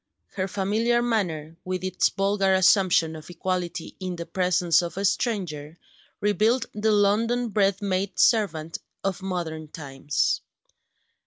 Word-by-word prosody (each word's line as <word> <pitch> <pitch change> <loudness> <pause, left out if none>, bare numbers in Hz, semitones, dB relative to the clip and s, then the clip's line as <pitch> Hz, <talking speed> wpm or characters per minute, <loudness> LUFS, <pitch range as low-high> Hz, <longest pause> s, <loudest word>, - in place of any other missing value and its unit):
Her 190 -2 -2
familiar 215 +5 +1
manner, 165 -9 -2
with 185 0 -3
its 185 -1 +1
vulgar 195 -1 +1
assumption 185 -3 +4
of 155 +1 -11
equality 175 -1 -3
in 185 -1 -4
the 170 -1 -6
presence 180 -2 +2
of 175 +1 -6
a 200 - -1
stranger, 175 - -2 0.4
revealed 215 +4 +2
the 215 +1 +1
London 225 +4 +2
bred 200 -1 +1
maid 190 0 -1
servant 165 -8 +2 0.2
of 195 0 -2
modern 170 -4 -4
times. 145 -1 -2
185 Hz, 130 wpm, -25 LUFS, 170-205 Hz, 0.4 s, assumption